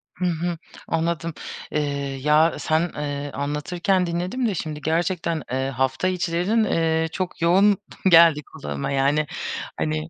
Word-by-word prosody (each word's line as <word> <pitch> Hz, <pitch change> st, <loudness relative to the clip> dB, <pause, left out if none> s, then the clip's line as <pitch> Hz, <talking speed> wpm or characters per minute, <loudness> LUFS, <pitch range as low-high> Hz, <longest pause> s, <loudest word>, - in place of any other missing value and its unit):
Hı 180 Hz, -, -2 dB
hı. 175 Hz, 0 st, -1 dB, 0.3 s
Anladım. 165 Hz, 0 st, -1 dB, 0.4 s
Eee, 140 Hz, -2 st, -2 dB
ya, 150 Hz, +3 st, +4 dB
sen 160 Hz, +2 st, +1 dB
eee, 145 Hz, -1 st, -4 dB
anlatırken 175 Hz, +6 st, 0 dB
dinledim 180 Hz, +9 st, -1 dB
de 205 Hz, -, -1 dB
şimdi 155 Hz, -2 st, -4 dB
gerçekten, 165 Hz, -1 st, -1 dB
eee, 130 Hz, +1 st, -1 dB
hafta 130 Hz, +5 st, 0 dB
içlerin, 180 Hz, +4 st, +1 dB
eee, 160 Hz, -4 st, +1 dB
çok 185 Hz, 0 st, -4 dB
yoğun 195 Hz, +4 st, +5 dB, 0.3 s
geldi 165 Hz, -3 st, +7 dB
kulağıma, 75 Hz, -, -5 dB
yani. 140 Hz, +3 st, +2 dB, 0.5 s
Hani, 75 Hz, +1 st, -2 dB
160 Hz, 130 wpm, -23 LUFS, 145-175 Hz, 0.5 s, geldi